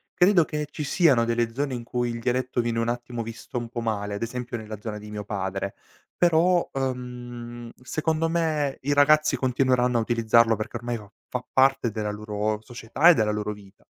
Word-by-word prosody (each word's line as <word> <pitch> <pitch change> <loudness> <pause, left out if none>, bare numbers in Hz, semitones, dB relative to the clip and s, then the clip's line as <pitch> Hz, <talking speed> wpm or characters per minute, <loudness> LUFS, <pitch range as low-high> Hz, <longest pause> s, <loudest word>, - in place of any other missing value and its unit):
Credo 180 -3 +5
che 150 -1 -3
ci 150 - -5
siano 140 -7 +4
delle 115 0 0
zone 140 0 -2
in 120 - -4
cui 120 0 -2
il 115 - -4
dialetto 125 +1 0
viene 115 -1 -1
un 115 - 0
attimo 120 -1 -3
visto 115 +2 -7
un 120 -1 -4
po' 120 0 -4
male, 105 -2 -2
ad 100 - -6
esempio 125 0 -4
nella 110 -1 -7
zona 105 0 -5
di 105 0 -10
mio 105 -1 -5
padre, 100 -1 -3 0.4
però, 175 +1 +4
ehm, 120 -2 -5
secondo 160 +4 -1
me 155 -4 0
i 145 +2 0
ragazzi 150 0 +5
continueranno 125 -1 +2
a 115 - +2
utilizzarlo 115 0 +3
perché 110 +3 -4
ormai 120 0 -3
va 105 -2 -13 0.2
fa 125 0 -3
parte 135 -2 +3
della 105 -1 -2
loro 105 0 -2
società 120 +7 +2
e - - +9
della 105 -1 +2
loro 105 0 -2
vita. 100 -2 -17
120 Hz, 195 wpm, -25 LUFS, 110-135 Hz, 0.4 s, e